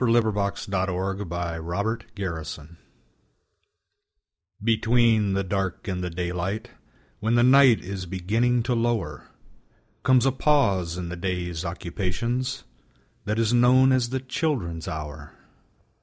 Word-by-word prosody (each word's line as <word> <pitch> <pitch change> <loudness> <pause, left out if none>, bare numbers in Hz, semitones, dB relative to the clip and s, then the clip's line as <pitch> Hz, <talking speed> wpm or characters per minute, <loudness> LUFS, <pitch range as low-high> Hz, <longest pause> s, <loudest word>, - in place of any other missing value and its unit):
FLIGHT 120 - +3
THE 100 -2 -1
SECOND 95 0 -2
THE 85 +6 -3
CHILDREN'S 85 -6 -4
HOUR 75 +1 -14 1.9
Between 115 -2 +3
the 100 0 0
dark 95 -1 -3
and 90 -2 -2
the 90 - -2
daylight, 90 +4 -3 0.5
When 110 +3 +1
the 120 - +5
night 130 -2 +6
is 95 0 -5
beginning 115 +7 +1
to 125 - 0
lower, 115 - -1 0.7
Comes 130 -1 +4
a 135 - +4
pause 100 - +2
in 90 -1 -4
the 90 - -5
day's 90 -2 -3
occupations, 105 +9 -3 0.6
That 105 +2 -1
is 115 0 +2
known 125 +2 +5
as 125 -2 +2
the 130 +1 -1
Children's 130 - -2
Hour. 75 -2 -6
100 Hz, 125 wpm, -25 LUFS, 90-120 Hz, 1.9 s, night